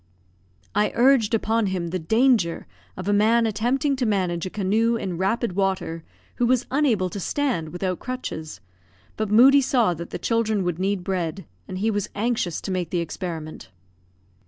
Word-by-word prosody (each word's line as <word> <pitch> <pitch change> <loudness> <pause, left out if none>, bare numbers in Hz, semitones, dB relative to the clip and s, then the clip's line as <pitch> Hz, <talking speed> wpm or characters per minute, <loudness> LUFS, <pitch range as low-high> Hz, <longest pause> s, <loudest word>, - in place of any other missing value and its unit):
I 210 +1 +2
urged 240 -3 +4
upon 225 0 +1
him 180 -3 -2
the 185 +2 -2
danger 220 -1 +2 0.3
of 185 +1 -6
a 205 - +2
man 225 +3 +4
attempting 245 +7 0
to 255 - 0
manage 185 -4 0
a - - -5
canoe 215 +4 +1
in 180 -6 -4
rapid 195 +2 0
water, 190 -4 -1 0.3
who 240 - +2
was 250 0 +2
unable 255 -10 +2
to 200 - -5
stand 235 - -1
without 180 +1 -3
crutches; 250 -12 -6 0.5
but 215 -1 -2
Moodie 260 +6 +7
saw 240 -8 +2
that 170 +1 -7
the - - -4
children 220 -3 0
would 175 -1 -2
need 195 -1 -1
bread, 185 0 -3 0.2
and 185 - -5
he 220 +4 +1
was 205 -2 -2
anxious 220 -5 -1
to 195 - -5
make 180 -2 -2
the 180 - -1
experiment. 165 - -5
205 Hz, 170 wpm, -24 LUFS, 180-235 Hz, 0.5 s, Moodie